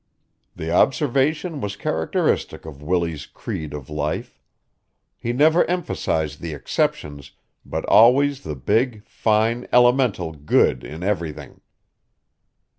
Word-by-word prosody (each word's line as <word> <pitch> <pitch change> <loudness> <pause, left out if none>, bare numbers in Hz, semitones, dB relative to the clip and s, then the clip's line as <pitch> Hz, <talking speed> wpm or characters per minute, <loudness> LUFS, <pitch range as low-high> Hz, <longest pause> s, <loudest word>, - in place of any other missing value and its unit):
The 80 +1 -5
observation 145 - +1
was 100 0 -4
characteristic 80 -4 -1
of 75 -3 -10
Willie's 85 -2 -2
creed 80 -2 -6
of 75 -3 -7
life. 75 0 -4 0.8
He 120 - -3
never 155 +7 +4
emphasized 115 - -2
the 80 -3 -5
exceptions 70 0 -2 0.3
but - - -4
always 135 +5 +5
the 75 - -5
big, 110 - 0
fine, 115 +3 0
elemental 120 -8 +3
good 70 -4 +2
in 80 +4 -8
everything. 80 -7 -4
95 Hz, 110 wpm, -22 LUFS, 75-125 Hz, 0.8 s, always